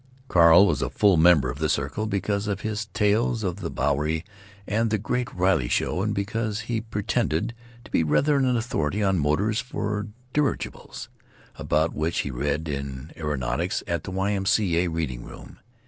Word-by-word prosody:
Carl 85 0 +7
was 75 -7 0
full 100 -3 +5
member 80 -6 +5
of 70 - -9
the 80 -1 0
circle 75 +10 -1
because 100 0 -1
of 100 -1 -2
his 110 0 -3
tales 110 +1 +1
of 90 -2 -2
the 90 -5 -4
Bowery 75 +3 0 0.4
and 110 +3 0
the 110 - +1
Great 125 +4 -2
Riley 90 -8 +1
Show, 90 - 0
and 105 +2 0
because 105 +1 -2
he 115 0 -2
pretended 105 -2 -1 0.3
to - - -15
be - - +2
rather 140 - +2
an 130 -3 +2
authority 105 - -1
on 95 -2 +2
motors 100 - +1
for 105 -6 -3 0.3
dirigibles, 150 -2 -2 0.5
about 80 +2 0
which 80 +2 -1
he 70 - -4
read 75 +5 -2
in 70 0 -5
Aeronautics 75 -5 -2
at 85 -2 -2
the - - -6
Y. 95 +2 -1
M. 95 -2 -1
C. 100 -4 +2
A. 90 - +1
reading 80 -8 -3
room. - - -12
95 Hz, 175 wpm, -25 LUFS, 80-110 Hz, 0.5 s, Carl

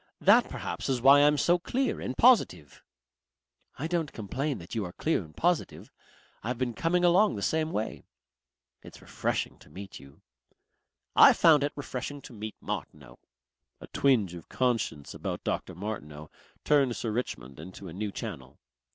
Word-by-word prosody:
That - - +5
perhaps - - -5
is 130 -2 +1
why 140 +3 +7
I'm 150 +1 +4
so 175 +4 +3
clear 260 +8 -1
and 130 - -4
positive." 225 - +3 1.0
"I 145 - -4
don't 165 -2 -1
complain 130 +6 -3
that 85 +1 -11
you 110 - -1
are 90 -2 -7
clear 160 - 0
and 80 0 -17
positive. 175 -1 -1 0.5
I've 120 +3 -3
been 125 -1 -2
coming 175 +7 +1
along 185 - +4
the 100 - -5
same 160 0 0
way.... 110 - -3 0.8
It's - - -13
refreshing - - -3
to - - -18
meet 95 +5 -10
you." 70 0 -17 0.9
"I - - +9
found 155 -4 +5
it 145 - 0
refreshing 145 0 -5
to - - -11
meet 110 -1 -7
Martineau." 65 -5 -7 0.6
A - - -10
twinge 115 -10 +1
of 85 -2 -11
conscience 115 - -1
about - - -5
Dr. - - -3
Martineau 75 -7 -7 0.3
turned 140 -5 +3
Sir 115 - -3
Richmond 70 - -5
into 95 +4 -10
a 80 - -9
new 105 +3 -4
channel. 65 -8 -7
120 Hz, 160 wpm, -28 LUFS, 90-150 Hz, 1.0 s, I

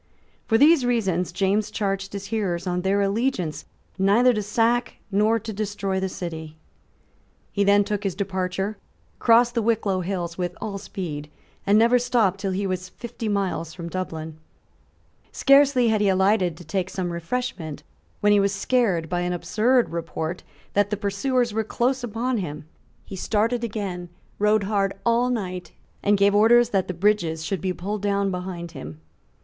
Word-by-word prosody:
For 225 - +4
these 295 +2 +6
reasons 195 -8 0
James 200 +3 +1
charged 195 -1 -2
his 200 0 -5
hearers 185 -6 -1
on 180 -1 -1
their 195 +2 +1
allegiance 200 - -1 0.3
neither 220 +6 +4
to 215 - -1
sack 230 +4 +1 0.2
nor 210 +3 +3
to 225 0 -6
destroy 200 -2 -2
the 190 0 -1
city, 160 -3 -6 0.9
He 200 - +1
then 200 +1 +5
took 205 0 -3
his 195 -4 -2
departure, 190 +1 -2 0.4
crossed 235 +1 +5
the 235 - +1
Wicklow 215 -4 +1
hills 175 -2 -4
with 180 0 -3
all 200 -2 -4
speed, 155 -7 -6 0.4
and 205 +1 +5
never 235 +3 +5
stopped 235 -6 +1
till 195 0 -2
he 195 +2 -1
was 185 -1 -3
fifty 235 +1 -6
miles 190 -5 -2
from 170 -2 -6
Dublin. 160 -4 -5 0.9
Scarcely 275 -3 +4
had 215 -1 +2
he 205 - +3
alighted 190 -3 +2
to 175 - -12
take 185 +3 -2
some 180 -2 -3
refreshment 170 -4 -4 0.4
when 205 0 +5
he 205 - +5
was 200 0 +2
scared 200 -7 +1
by 175 +1 -1
an 175 0 -1
absurd 235 +7 +2
report 165 0 -4 0.3
that 205 0 +2
the 210 - -1
pursuers 240 +3 0
were 220 +1 0
close 250 +4 0
upon 240 +1 -1
him. 150 -5 -5 0.4
He - - -8
started 225 +5 0
again, 195 -6 -4 0.3
rode 210 0 +3
hard 195 -1 0
all 235 +1 +3
night, 185 -7 -4 0.3
and 205 0 +3
gave 200 +1 +4
orders 230 +3 +5
that 195 -5 0
the 185 - -4
bridges 170 -4 +1
should 190 -2 -2
be 185 - -1
pulled 200 +4 -4
down 200 -1 +1
behind 180 -2 -5
him. 75 +1 -9
200 Hz, 165 wpm, -24 LUFS, 180-225 Hz, 0.9 s, these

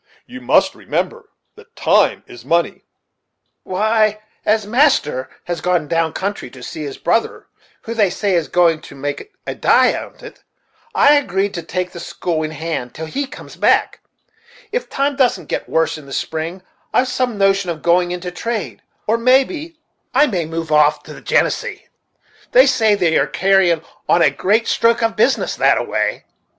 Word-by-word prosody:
You 255 0 -10
must - - +3
remember 470 -2 -4 0.3
that - - -18
time - - +2
is 380 -4 -13
money." 170 0 0 0.8
"Why, 215 +2 +1 0.2
as 215 0 +1
master 210 - +2
has 175 -1 -4
gone 180 -4 0
down 165 0 0
country 200 -8 -4
to 125 0 -13
see 155 - -7
his 145 -2 -6
mother, 225 - 0 0.4
who, 230 - -5
they 210 -4 +2
say, 200 +1 -1
is 170 -4 +1
going 165 0 +2
to - - -12
make 145 - -5
a - - -3
die - - +4
on't, - - -9 0.5
I 290 -8 +6
agreed 200 -8 +1
to 170 - -4
take 180 +2 -3
the 170 - -9
school 170 -1 -3
in 155 - -2
hand 155 -6 -5
till 160 - -5
he 275 - -3
comes - - -11
back, - - +2 0.7
It - - -3
times 280 0 -1
doesn't 255 -3 +2
get - - -3
worse 160 -1 0
in 145 - -14
the 135 - -9
spring, 165 +6 -4 0.3
I've 255 - +2
some 250 -3 -1
notion 195 -1 +2
of 160 -3 -5
going 175 +1 +3
into 180 0 -5
trade, 225 +4 -4 0.2
or 225 +2 +1
maybe 275 +7 +1 0.4
I 285 +3 +6
may 185 - -2
move 165 0 -5
off 150 0 +3
to - - -11
the - - -12
Genesee; - - 0 0.7
they - - +7
say 220 -3 +3
they 170 -5 +2
are - - +1
carryin' 190 -4 +2 0.3
on 170 - +5
a 145 - +4
great 210 - +1
stroke 230 0 +2
of 225 0 0
business 240 +4 +1
that - - +4
a - - -1
way. - - -2
190 Hz, 175 wpm, -18 LUFS, 165-235 Hz, 0.8 s, they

